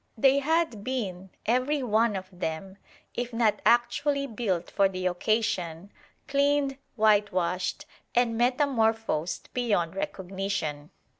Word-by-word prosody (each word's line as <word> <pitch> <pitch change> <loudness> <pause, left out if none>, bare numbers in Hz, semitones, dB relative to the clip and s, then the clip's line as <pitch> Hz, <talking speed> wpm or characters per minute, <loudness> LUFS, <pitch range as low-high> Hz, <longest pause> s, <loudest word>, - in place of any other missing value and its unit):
They 270 +4 +5
had 310 -7 0
been, 195 -7 -3 0.2
every 255 +5 +1
one 225 -1 +2
of 190 -1 -5
them, 180 +2 -5 0.4
if 245 0 -3
not 230 -2 +1
actually 275 +4 +2
built 215 -8 -2
for 195 -1 +3
the 185 -1 -4
occasion, 180 -2 -1 0.4
cleaned, 280 -1 +1 0.2
whitewashed, 200 -5 +1 0.3
and 240 -1 +3
metamorphosed 225 - +1
beyond 205 -9 0
recognition. 190 - -3
220 Hz, 105 wpm, -27 LUFS, 185-255 Hz, 0.4 s, They